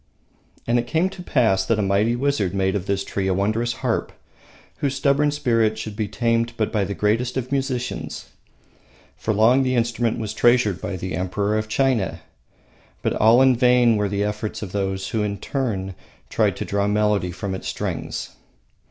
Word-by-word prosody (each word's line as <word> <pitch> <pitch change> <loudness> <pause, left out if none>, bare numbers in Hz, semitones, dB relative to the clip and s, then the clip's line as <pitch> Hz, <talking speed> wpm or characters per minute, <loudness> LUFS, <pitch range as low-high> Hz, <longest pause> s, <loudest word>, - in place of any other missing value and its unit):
And 120 +1 +2
it 120 - -3
came 165 +8 +1
to 190 -2 -9
pass 115 - +2
that 115 - +1
a 105 - +1
mighty 100 +4 +2
wizard 120 -8 0
made 95 0 +1
of 100 -1 -3
this 100 -1 0
tree 95 -1 -3
a 95 - +1
wondrous 110 +5 0
harp, - - 0 0.7
whose 140 -1 -1
stubborn 140 +2 +2
spirit 115 -7 +1
should 110 -1 -6
be 105 0 -2
tamed 115 +3 0
but 110 - 0
by 105 -3 +1
the 100 - -4
greatest 115 +7 0
of 130 0 -3
musicians. 130 -3 -3 0.9
For 110 - -2
long 115 +5 +4
the 130 -1 +1
instrument 120 -1 0
was 110 -2 -4
treasured 115 -5 +3
by - - -3
the 90 -2 -4
Emperor 100 +4 -1
of 110 0 -1
China, 120 -4 0 0.8
but - - +1
all 115 +4 +5
in 130 -1 +5
vain 125 -1 +4
were 105 -1 0
the 100 +1 -1
efforts 105 +1 -3
of 95 - -6
those 95 -1 -2
who 110 - -1
in 100 -1 -2
turn 100 -5 -3 0.4
tried - - +1
to - - -3
draw 100 0 0
melody 105 -2 +1
from 95 +2 -4
its 95 - -5
strings. - - -4
110 Hz, 185 wpm, -22 LUFS, 100-125 Hz, 0.9 s, all